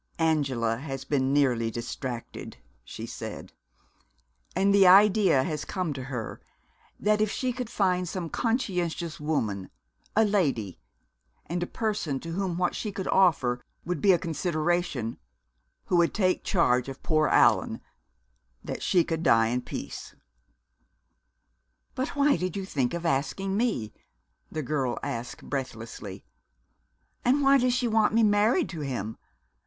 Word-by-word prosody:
"Angela 135 -8 +1
has 135 0 -6
been 135 -2 +1
nearly 125 -5 +2
distracted," 120 +1 -6 0.3
she - - -7
said. - - -7 1.0
"And 200 +1 +3
the 195 -2 +6
idea 195 -6 +6
has 150 +1 -3
come 180 -6 -2
to 130 -2 -6
her 125 -5 -5 0.6
that 210 +1 +2
if 215 - +2
she 255 +3 -1
could 250 -2 -5
find 180 -4 +1
some 180 -3 -4
conscientious 180 -7 -1
woman, 110 -11 -2 0.5
a 220 +1 +5
lady, 140 - 0 0.7
and 175 +2 -3
a 175 - -1
person 205 - -2
to 165 - -6
whom 180 -1 -2
what 180 0 +1
she 215 - -4
could 190 -1 -5
offer 135 -10 +3 0.2
would 175 -4 -2
be 200 - +6
a 180 - +5
consideration, 165 - -1 0.7
who 180 - +1
would 170 -1 +3
take 185 -3 +1
charge 125 - +2
of 135 - -9
poor 155 -1 +2
Allan, - - +3 0.8
that - - -5
she 175 -2 +3
could 165 -1 -3
die 115 -8 +4
in 125 +1 -1
peace." - - -7 1.8
"But 260 +3 -3
why 285 0 +4
did 185 -2 -3
you 195 - -3
think 135 -6 -1
of 170 0 -5
asking 165 +6 0
me?" 200 - -1 0.6
the 155 - -3
girl 135 -3 -1
asked 125 -4 -5
breathlessly. 115 -7 -6 1.0
"And 270 +4 +3
why 275 0 +6
does 250 0 +2
she 250 -1 +1
want 220 -1 +2
me 230 - +5
married 215 - +3
to 170 - -6
him? 120 -7 -4
165 Hz, 145 wpm, -27 LUFS, 130-200 Hz, 1.8 s, the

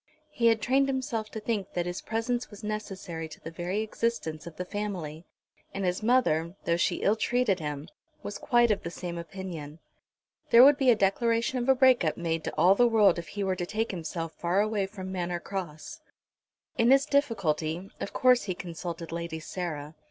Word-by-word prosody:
He 235 -5 +2
had 225 -1 +3
trained 270 +2 +3
himself 245 -5 -2
to 220 - -6
think 210 -3 -3
that 175 -1 -1
his 175 0 -4
presence 235 +2 -2
was 205 0 -12
necessary 190 -6 -5
to - - -11
the 165 - -8
very 175 +5 -2
existence 215 -8 -2
of 165 - -9
the 180 - -4
family; 180 -6 -5 0.5
and 195 -1 -2
his 180 +2 0
mother, 190 -8 +2
though 170 - +2
she - - 0
ill 205 - +4
treated 230 -4 +1
him, 150 -1 -5 0.4
was 205 - -5
quite 240 -2 +3
of 205 - 0
the 170 - -5
same 175 0 -6
opinion. 170 -4 -7 0.7
There 235 +1 +9
would 285 +1 +7
be 265 -2 +4
a 240 - +7
declaration 230 +5 +1
of 245 +2 -2
a 265 - +7
break 255 -4 +5
up 155 - 0
made 165 -2 -2
to - - -4
all 175 +5 +6
the 240 +4 +4
world 210 -6 +4
if 170 - -8
he 200 +5 -4
were 190 -1 0
to 175 - -3
take 220 +3 -1
himself 165 -2 -4
far 175 +3 0
away 210 -2 +1
from 190 -2 -7
Manor 175 -2 -2
Cross. 170 -5 -6 0.8
In 230 +1 +5
his 270 +1 +6
difficulty, 190 - 0
of - - -4
course 250 -1 +4
he 185 -3 -2
consulted 170 -1 -6
Lady 170 -1 -4
Sarah. 155 -3 -5
195 Hz, 195 wpm, -28 LUFS, 170-230 Hz, 0.8 s, There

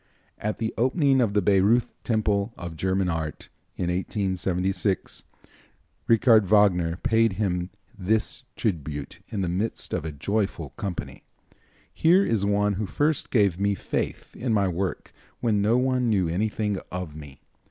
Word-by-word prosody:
At 105 0 -2
the 110 0 -2
opening 135 +1 +3
of 110 -4 +1
the 105 - +3
Baireuth 105 +5 +3
Temple 105 -1 0
of 85 -2 -7
German 95 +3 0
Art, 80 -3 -4 0.3
in 90 - -1
1876, 95 0 -1 0.8
Richard 115 -2 +5
Wagner 90 -5 +4
paid 115 +1 +2
him 90 -3 -1 0.3
this 105 +5 0
tribute 75 - -3
in 100 - -3
the 90 - 0
midst 95 +6 -2
of - - -1
a 80 - -4
joyful 100 +8 -2
company: 100 -7 -5 0.7
"Here 180 +5 +4
is 110 -4 0
one 100 0 +2
who 105 - -2
first 150 - 0
gave 100 -7 +2
me 100 0 +1
faith - - -4
in 120 -1 -2
my 100 -2 +2
work 90 +1 -3 0.3
when 105 -4 +1
no 110 +4 +3
one 125 -1 +1
knew 95 -5 +2
anything 105 +3 -1
of 90 -5 -5
me. 75 -3 -11
100 Hz, 145 wpm, -25 LUFS, 90-110 Hz, 0.8 s, Richard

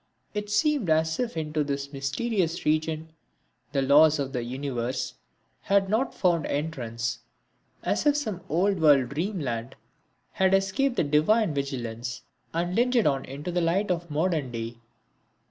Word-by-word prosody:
It 210 -1 -3
seemed 220 - +2
as 160 0 +2
if 240 -7 -2
into 155 -1 -1
this 140 0 -4
mysterious 165 +6 -1
region 155 +1 0 0.6
the 140 -1 +1
laws 150 +3 +6
of 135 -1 -3
the 125 - -1
universe 130 0 -3 0.5
had 195 0 +2
not 230 +5 0
found 170 -4 +2
entrance; 120 -6 -3 0.6
as - - 0
if 290 0 +4
some 215 -11 -3
old 185 +4 +2
world 145 -6 +5
dream 180 +8 -2
land 120 -3 -3 0.6
had 190 -1 +3
escaped 195 +7 +1
the - - +2
divine 155 +7 +3
vigilance 120 -4 -4 0.3
and 175 +2 -1
lingered 240 +1 +3
on 135 -1 +1
into 145 +6 -6
the 175 0 0
light 180 +4 +1
of 170 -1 -2
modern 155 -2 0
day. 115 0 -5
160 Hz, 145 wpm, -27 LUFS, 140-195 Hz, 0.6 s, laws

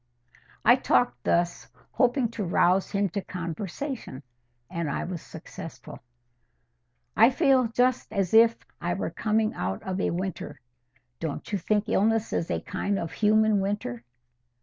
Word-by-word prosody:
I - - +7
talked 125 0 +1
thus, 175 0 +1 0.2
hoping 250 -2 +2
to 225 -2 -4
rouse 180 +1 +2
him 200 -1 +1
to 200 +4 -3
conversation, 180 - -5 0.4
and 170 +2 -3
I - - -2
was 175 -3 -5
successful. 160 -1 -10 1.2
"I 225 +2 +7
feel 265 -3 +3
just 245 0 +1
as 195 -3 -1
if 230 +1 +6 0.2
I - - -1
were - - -3
coming 215 0 0
out 95 +1 -3
of 190 0 -3
a - - +1
winter. 185 +1 -4 0.6
Don't 160 +3 -5
you 200 - 0
think 210 +4 0
illness 225 +2 +1
is 165 - -1
a - - -1
kind 200 +1 -2
of 165 -3 -4
human 215 0 +3
winter?" 195 - -3
200 Hz, 145 wpm, -27 LUFS, 170-225 Hz, 1.2 s, I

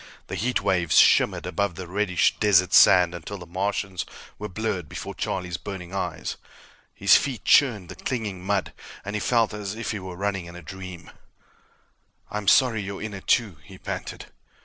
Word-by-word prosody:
The - - -3
heat 125 +2 0
waves 90 -4 +2
shimmered - - +5
above 100 -4 -1
the 95 +1 -6
reddish 90 0 +1
desert 95 -3 +4
sand 90 -2 +7
until 90 +4 -7
the 90 - -10
Martians 95 +1 -2 0.4
were 105 +1 -5
blurred 95 -5 -3
before - - -6
Charlie's 90 -2 -3
burning 95 -3 -8
eyes. 100 - -3 0.6
His - - +5
feet 135 -4 0
churned 110 -10 +4
the - - -8
clinging 105 -8 -4
mud, 100 0 -1 0.3
and 105 +1 -4
he - - 0
felt 115 -1 +2
as 105 -1 -5
if 115 - -3
he 105 - -4
were 95 -1 -8
running 95 -1 -2
in 85 - -11
a 90 - -10
dream. 90 0 -9 1.2
"I'm 105 -1 -4
sorry 115 0 +4
you're 100 0 -6
in 110 -1 -5
it, 95 - -9
too," 105 -9 +2
he 95 +5 -13
panted. - - -6
95 Hz, 175 wpm, -25 LUFS, 90-105 Hz, 1.2 s, sand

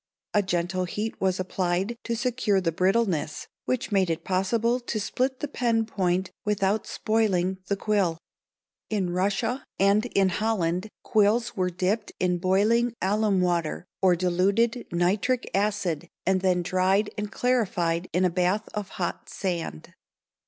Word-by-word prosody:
A 210 - +4
gentle 185 -1 -1
heat 210 +5 -4
was 185 -1 +1
applied 185 +3 -1
to 235 - -1
secure 235 -4 +1
the 175 -3 0
brittleness 185 -3 0 0.2
which 255 -2 -1
made 190 -3 +2
it 165 0 -2
possible 225 +6 +1
to 235 -3 -3
split 255 +5 -1
the 295 - -1
pen 235 -5 +1
point 185 -3 0
without 205 0 0
spoiling 190 -4 0
the 200 - +1
quill. 195 -6 +1 0.7
In 195 -5 0
Russia 205 +8 0
and 200 +4 +3
in 195 -5 +2
Holland 185 -2 0
quills 220 +3 +2
were 185 -1 +1
dipped 190 +4 -1
in 180 -1 +1
boiling 220 +6 +2
alum 205 0 +2
water 175 -2 0 0.2
or 185 -2 +5
diluted 195 +7 +1
nitric 195 +8 +1
acid 195 -5 0 0.2
and 185 0 +2
then 180 -2 +2
dried 190 +3 +2
and 210 -1 -4
clarified 185 -9 0
in 180 +1 +2
a 180 - +2
bath 185 +4 0
of 210 -2 -4
hot 175 -2 -3
sand. 170 - -4
195 Hz, 145 wpm, -26 LUFS, 180-220 Hz, 0.7 s, or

